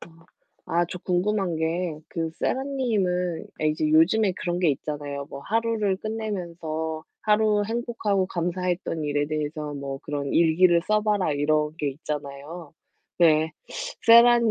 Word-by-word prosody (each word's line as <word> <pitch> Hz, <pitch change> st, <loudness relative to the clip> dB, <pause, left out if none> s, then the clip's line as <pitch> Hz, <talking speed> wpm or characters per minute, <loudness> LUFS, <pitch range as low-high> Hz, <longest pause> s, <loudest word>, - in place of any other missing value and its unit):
아. 165 Hz, 0 st, -15 dB, 0.4 s
아 170 Hz, +1 st, +2 dB
저 180 Hz, -, -6 dB
궁금한 185 Hz, -1 st, 0 dB
게 160 Hz, 0 st, -1 dB
그 165 Hz, -1 st, -3 dB
세라 265 Hz, -, 0 dB
님은 190 Hz, -11 st, -1 dB, 0.2 s
예 -, -, +3 dB
이제 155 Hz, 0 st, 0 dB
요즘에 185 Hz, +6 st, +4 dB
그런 175 Hz, 0 st, -3 dB
게 175 Hz, -, +3 dB
있잖아요. 145 Hz, 0 st, -4 dB
"뭐 140 Hz, -, -9 dB
하루를 220 Hz, -1 st, 0 dB
끝내면서 170 Hz, -7 st, -4 dB, 0.2 s
하루 210 Hz, -1 st, +3 dB
행복하고 225 Hz, -4 st, -1 dB
감사했던 175 Hz, -2 st, -2 dB
일에 145 Hz, 0 st, 0 dB
대해서 150 Hz, -1 st, -3 dB
뭐 140 Hz, -1 st, -5 dB
그런 145 Hz, -2 st, -3 dB
일기를 170 Hz, +1 st, +4 dB
써 215 Hz, 0 st, +3 dB
봐라." 205 Hz, -7 st, +1 dB
이런 150 Hz, +2 st, +1 dB
게 150 Hz, -, 0 dB
있잖아요. 150 Hz, +3 st, -7 dB, 0.4 s
네. 160 Hz, -2 st, +4 dB, 0.6 s
세라 235 Hz, +1 st, +8 dB
님은 230 Hz, -, +2 dB
170 Hz, 285 characters per minute, -25 LUFS, 155-205 Hz, 0.6 s, 세라